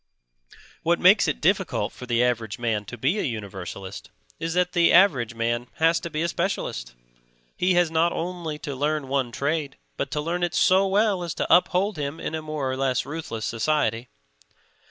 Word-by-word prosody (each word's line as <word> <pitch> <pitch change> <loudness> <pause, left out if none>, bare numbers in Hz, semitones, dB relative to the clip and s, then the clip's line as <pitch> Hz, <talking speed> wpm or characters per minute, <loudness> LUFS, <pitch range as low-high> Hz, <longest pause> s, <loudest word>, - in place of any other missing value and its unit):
What - - +1
makes - - +6
it - - -1
difficult - - 0
for 125 - -10
the 120 0 +2
average 115 -4 -1
man 110 -3 -1
to 120 - -8
be 145 - +1
a - - +1
universalist 100 -3 -6 0.3
is 165 +1 -3
that 180 0 +2
the 175 -2 +4
average 135 - +4
man 120 +1 -1
has 165 +1 +3
to 170 - -6
be 155 0 -2
a - - +1
specialist; 160 - -3 0.6
he 180 0 +2
has 175 -2 +3
not 165 +1 +2
only 170 -3 -4
to 140 - -4
learn 145 0 -1
one 135 -3 0
trade, 145 +2 -2 0.2
but 140 - -2
to 150 - -2
learn 170 +4 -2
it 175 -1 -1
so 190 +1 +4
well 200 -1 +2
as 170 -2 -4
to - - +4
uphold 185 +2 +1
him 145 +2 -4
in - - -4
a 160 - -2
more 155 -4 -3
or 130 - -3
less 130 -2 0
ruthless 140 -7 -5
society. 115 -1 0
150 Hz, 190 wpm, -25 LUFS, 120-170 Hz, 0.6 s, makes